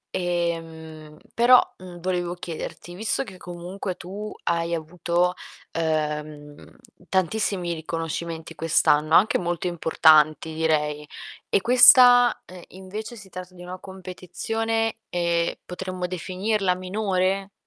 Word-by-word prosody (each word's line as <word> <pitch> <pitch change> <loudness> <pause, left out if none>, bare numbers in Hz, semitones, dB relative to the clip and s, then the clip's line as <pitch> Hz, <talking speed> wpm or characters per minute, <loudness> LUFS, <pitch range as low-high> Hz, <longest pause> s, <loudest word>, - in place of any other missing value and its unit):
Ehm, 165 -3 -4 0.2
però, 245 +2 +7 0.2
mhmm, 180 -1 -10
volevo 175 -1 -2
chiederti, 175 0 -7
visto 220 +7 -1
che 190 -6 -12
comunque 180 +2 -6
tu 205 +4 -7
hai 170 0 0
avuto, 175 +2 -1 0.4
ehm, 150 -2 -3 0.3
tantissimi 190 -1 0
riconoscimenti 165 0 -5
quest'anno, 155 -1 +2
anche 210 - +4
molto 175 0 -3
importanti 160 -2 +3
direi, 150 -2 0 0.4
e - - +2
questa, 245 +1 +7
ehm, 180 0 -12
invece 205 +5 -8
si 205 -3 -13
tratta 185 0 -9
di 175 - -11
una 180 +1 -8
competizione, 225 +5 -3
ehm, 170 -1 0
potremmo 185 0 -5
definirla 185 +2 -1
minore? 190 0 -1
180 Hz, 110 wpm, -24 LUFS, 165-190 Hz, 0.4 s, però